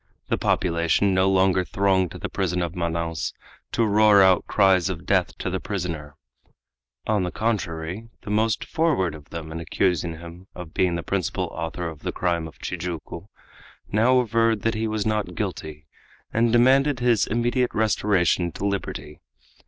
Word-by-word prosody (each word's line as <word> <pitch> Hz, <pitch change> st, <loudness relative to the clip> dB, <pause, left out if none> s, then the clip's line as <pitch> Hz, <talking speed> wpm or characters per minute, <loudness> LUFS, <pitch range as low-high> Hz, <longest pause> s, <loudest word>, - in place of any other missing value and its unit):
The -, -, +1 dB
population 85 Hz, +3 st, +1 dB
no 95 Hz, +1 st, +3 dB
longer 95 Hz, -1 st, +3 dB
thronged 95 Hz, -1 st, +1 dB
to -, -, -9 dB
the -, -, -4 dB
prison 90 Hz, -2 st, -1 dB
of 85 Hz, -1 st, -4 dB
Manaos 85 Hz, -4 st, -2 dB, 0.4 s
to 115 Hz, -, +2 dB
roar 105 Hz, -1 st, +6 dB
out 95 Hz, -1 st, +4 dB
cries 95 Hz, -3 st, +3 dB
of 90 Hz, -3 st, -5 dB
death 95 Hz, -2 st, +1 dB
to -, -, -5 dB
the 95 Hz, -, -1 dB
prisoner. 85 Hz, -8 st, -4 dB, 0.9 s
On 105 Hz, -2 st, +1 dB
the 90 Hz, -, -1 dB
contrary, 95 Hz, -1 st, -3 dB
the 105 Hz, -, -5 dB
most 110 Hz, +1 st, +1 dB
forward 145 Hz, -, +1 dB
of 75 Hz, -2 st, -12 dB
them 80 Hz, -1 st, -7 dB
in 80 Hz, -, -5 dB
accusing 85 Hz, 0 st, 0 dB
him 85 Hz, +3 st, -11 dB
of 85 Hz, -3 st, -9 dB
being 90 Hz, -2 st, +1 dB
the 85 Hz, -, -3 dB
principal 95 Hz, -4 st, -2 dB
author 80 Hz, +2 st, -4 dB
of 80 Hz, -2 st, -8 dB
the -, -, -3 dB
crime 85 Hz, -2 st, -1 dB
of 80 Hz, -, -14 dB
Tijuco 85 Hz, -5 st, -6 dB, 0.6 s
now 120 Hz, +5 st, +4 dB
averred 115 Hz, -2 st, +2 dB
that 115 Hz, -, +1 dB
he 110 Hz, +1 st, -1 dB
was 110 Hz, -1 st, -2 dB
not 105 Hz, -5 st, -1 dB
guilty, 75 Hz, -1 st, -5 dB, 0.5 s
and 115 Hz, 0 st, +2 dB
demanded 130 Hz, +3 st, +4 dB
his 120 Hz, -3 st, +2 dB
immediate 120 Hz, +2 st, +1 dB
restoration 100 Hz, -5 st, +2 dB
to -, -, -4 dB
liberty. 100 Hz, -6 st, -4 dB
95 Hz, 165 wpm, -24 LUFS, 85-110 Hz, 0.9 s, roar